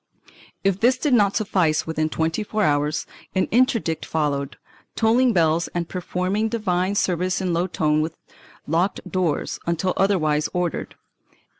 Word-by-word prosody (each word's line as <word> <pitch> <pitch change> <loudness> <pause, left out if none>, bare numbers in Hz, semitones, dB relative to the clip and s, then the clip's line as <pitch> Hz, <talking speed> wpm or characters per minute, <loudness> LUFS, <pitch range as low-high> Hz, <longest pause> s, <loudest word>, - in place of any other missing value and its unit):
If 195 -1 +1
this 250 +4 +3
did 285 +1 0
not 205 -4 +4
suffice 180 -7 +1
within 155 -1 -1
twenty 160 +6 -1
four 215 +1 -1
hours, 150 -1 +1 0.3
an 190 - +2
interdict 230 - +2
followed, 140 -3 -2 0.4
tolling 240 +3 +3
bells 165 -3 +2
and 170 -1 -1
performing 185 +4 -2
divine 195 -4 0
service 180 -1 0
in 185 -2 -1
low 175 +2 +1
tone 155 -3 +1
with 160 +1 -4 0.5
locked 170 +6 -1
doors, 180 -5 -1
until 170 +2 0
otherwise 155 -7 +2
ordered. 180 -3 -2
180 Hz, 140 wpm, -23 LUFS, 160-200 Hz, 0.5 s, not